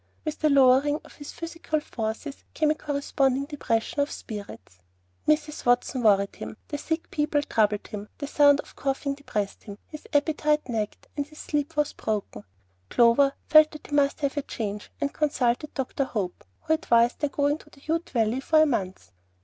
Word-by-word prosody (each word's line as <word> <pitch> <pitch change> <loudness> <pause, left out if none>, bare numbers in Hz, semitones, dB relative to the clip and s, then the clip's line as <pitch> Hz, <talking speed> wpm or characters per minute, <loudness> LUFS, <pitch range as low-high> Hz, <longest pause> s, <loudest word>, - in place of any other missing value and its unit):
With 310 -1 -3
the 310 - +3
lowering 280 +2 +5
of - - -16
his 290 - -8
physical 330 -2 -3
forces 235 +1 -5
came 305 -1 +3
a - - +1
corresponding 280 -2 0
depression 280 -3 -2
of 285 +1 +2
spirits. 200 - -9 0.5
Mrs. 305 0 +1
Watson 245 +1 +2
worried 200 -3 +3
him, - - -7
the 290 - -3
sick 320 +2 -3
people 295 -1 +1
troubled 210 -5 +1
him, 210 0 -7
the 285 - -4
sound 285 0 +5
of - - -18
coughing 275 +1 -1
depressed 210 -8 -4
him, 205 -1 -8
his 305 -1 -11
appetite 300 0 +1
nagged, 220 -4 -3
and 285 -1 -2
his 305 0 -17
sleep 295 +1 -3
was 295 0 +1
broken. 205 - -4 0.4
Clover 245 +4 +5
felt 310 0 +7
that 305 - -12
he 290 - -3
must 285 +1 +2
have 280 0 -1
a - - +2
change, 210 -5 -5
and 280 - -1
consulted 290 -1 0
Dr. 270 0 -1
Hope, 200 -8 -4 0.2
who 320 0 +1
advised 235 -6 +3
their 295 - 0
going 285 +2 +1
to - - -18
the 275 - -20
Ute 330 +2 -1
Valley 230 0 +1
for 310 +3 +3
a 310 - +7
month. 190 -10 -3
280 Hz, 180 wpm, -26 LUFS, 235-300 Hz, 0.5 s, felt